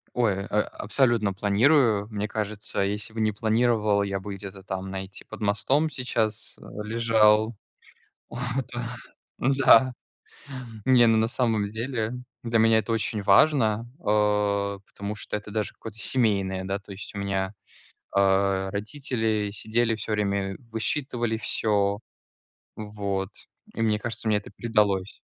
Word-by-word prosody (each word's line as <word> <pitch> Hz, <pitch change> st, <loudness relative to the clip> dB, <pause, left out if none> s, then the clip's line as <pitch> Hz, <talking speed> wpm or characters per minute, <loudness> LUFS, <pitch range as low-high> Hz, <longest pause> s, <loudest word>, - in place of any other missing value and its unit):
Ой, 100 Hz, -5 st, +1 dB
а 105 Hz, 0 st, +1 dB
абсолютно 110 Hz, -3 st, +1 dB
планирую. 105 Hz, +1 st, +3 dB
Мне 105 Hz, -1 st, -3 dB
кажется, 105 Hz, -2 st, -2 dB
если 105 Hz, +2 st, -1 dB
бы 110 Hz, -, -3 dB
не 110 Hz, 0 st, +2 dB
планировал, 110 Hz, -1 st, +2 dB
я 100 Hz, -1 st, -2 dB
бы 100 Hz, 0 st, -6 dB
где-то 95 Hz, 0 st, -9 dB
там, 95 Hz, -1 st, -4 dB
знаете, 95 Hz, 0 st, -7 dB
под -, -, -10 dB
мостом 130 Hz, +10 st, +2 dB
сейчас 115 Hz, -5 st, -1 dB, 0.3 s
лежал. 110 Hz, 0 st, +3 dB, 0.7 s
О -, -, -8 dB, 0.4 s
да! 120 Hz, 0 st, -4 dB, 0.4 s
Да, 130 Hz, -1 st, +5 dB, 0.9 s
не, 125 Hz, -2 st, +6 dB
ну, 115 Hz, -1 st, +4 dB
на 110 Hz, +1 st, +2 dB
самом 115 Hz, -5 st, +1 dB
деле, 115 Hz, +1 st, -3 dB, 0.3 s
для 115 Hz, -1 st, +1 dB
меня 110 Hz, 0 st, +5 dB
это 115 Hz, -, -1 dB
очень 110 Hz, -1 st, -1 dB
важно, 110 Hz, +1 st, +4 dB, 0.2 s
а, 105 Hz, -1 st, +1 dB
потому 100 Hz, +1 st, -6 dB
что 105 Hz, -, -3 dB
это 105 Hz, 0 st, -8 dB
даже 105 Hz, -1 st, -2 dB
какое-то 110 Hz, -1 st, -10 dB
семейное, 100 Hz, -5 st, +1 dB
да, 95 Hz, +1 st, -2 dB
то 100 Hz, 0 st, -12 dB
есть 95 Hz, +2 st, -9 dB
у -, -, -5 dB
меня, 95 Hz, -1 st, -1 dB, 0.6 s
а, 95 Hz, 0 st, +2 dB
родители 110 Hz, -1 st, -1 dB
сидели 115 Hz, +2 st, 0 dB
всё 110 Hz, +1 st, -5 dB
время, 100 Hz, -2 st, -1 dB
высчитывали 120 Hz, 0 st, -1 dB
всё. 100 Hz, -3 st, 0 dB, 0.8 s
Вот. 100 Hz, -2 st, -3 dB, 0.4 s
И 115 Hz, -, -2 dB
мне 110 Hz, -1 st, +2 dB
кажется, 115 Hz, 0 st, -3 dB
мне 105 Hz, -, +3 dB
это 100 Hz, -, -11 dB
передалось. 105 Hz, -4 st, +1 dB
105 Hz, 135 wpm, -26 LUFS, 100-115 Hz, 0.9 s, не